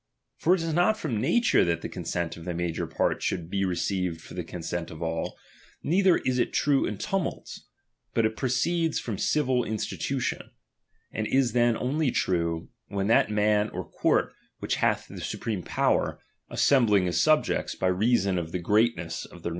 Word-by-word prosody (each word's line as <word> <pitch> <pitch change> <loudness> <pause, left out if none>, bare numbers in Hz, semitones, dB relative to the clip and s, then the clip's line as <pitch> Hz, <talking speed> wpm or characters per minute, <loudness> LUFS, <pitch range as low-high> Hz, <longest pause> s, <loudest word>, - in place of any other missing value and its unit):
For 180 +3 +3
it 170 - -3
is 165 -1 -2
not 180 +6 +3
from 115 - -2
nature 240 - +3
that 85 -1 0
the - - -2
consent 85 -1 -3
of 85 - -10
the 90 -2 -3
major 85 -2 -2
part - - 0
should 85 -1 -2
be 100 -1 0
received 90 -2 -1
for - - -12
the 90 - -4
consent 85 0 -5
of 80 +1 -7
all, 80 0 -3 0.5
neither 185 +3 +4
is 125 -1 -1
it - - +1
true 145 -2 +2
in 105 - -4
tumults; 195 - -4 0.5
but 115 - +3
it 110 0 0
proceeds 155 +7 0
from 110 -5 -5
civil 130 -5 +1
in 110 - -3
stitution: 125 +4 -3 0.6
and 110 -1 -2
is 130 -4 +2
then 120 -1 +3
only 145 +3 0
true, 85 -6 -1 0.2
when 100 -1 -2
that 115 - +4
man 105 0 +2
or - - -6
court - - +1 0.2
which - - -2
hath - - +1
the - - -9
supreme 105 -5 -3
power, - - 0 0.3
assembling 110 -9 +3
his 90 - +1
subjects, 155 0 +2
by - - -3
reason 100 0 +2
of 80 -1 -5
the 90 - -1
greatness 90 -2 +1
of - - -15
their 90 - -13
DOMINION. 85 - -4
105 Hz, 185 wpm, -27 LUFS, 90-130 Hz, 0.6 s, neither